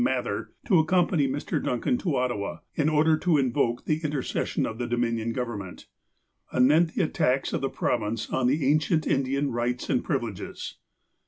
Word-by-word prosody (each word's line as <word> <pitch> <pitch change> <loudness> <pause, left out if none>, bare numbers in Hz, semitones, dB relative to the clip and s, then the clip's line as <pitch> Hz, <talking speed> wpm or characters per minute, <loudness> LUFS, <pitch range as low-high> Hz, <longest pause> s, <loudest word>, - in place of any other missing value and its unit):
Mather, 260 - -1 0.2
to 185 -7 +4
accompany 165 -2 +2
Mr. 135 +2 -2
Duncan 125 - 0
to 170 -7 -1
Ottawa, 120 -6 -2
in 150 0 +1
order 155 +1 +3
to 165 -1 +2
invoke 125 -3 0
the 155 +1 0
intercession 145 -3 -1
of 110 +1 -5
the 120 - -2
Dominion 115 -1 0
Government, 115 -7 -5 0.7
anent 155 +6 +4
the 195 - +2
attacks 140 -5 0
of - - -1
the 135 - 0
Province 110 -3 -1
on 130 -1 +1
the 140 +2 +1
ancient 155 +2 +2
Indian 140 +1 0
rights 120 +1 -2
and - - +1
privileges. 110 -5 -4
135 Hz, 160 wpm, -26 LUFS, 120-155 Hz, 0.7 s, to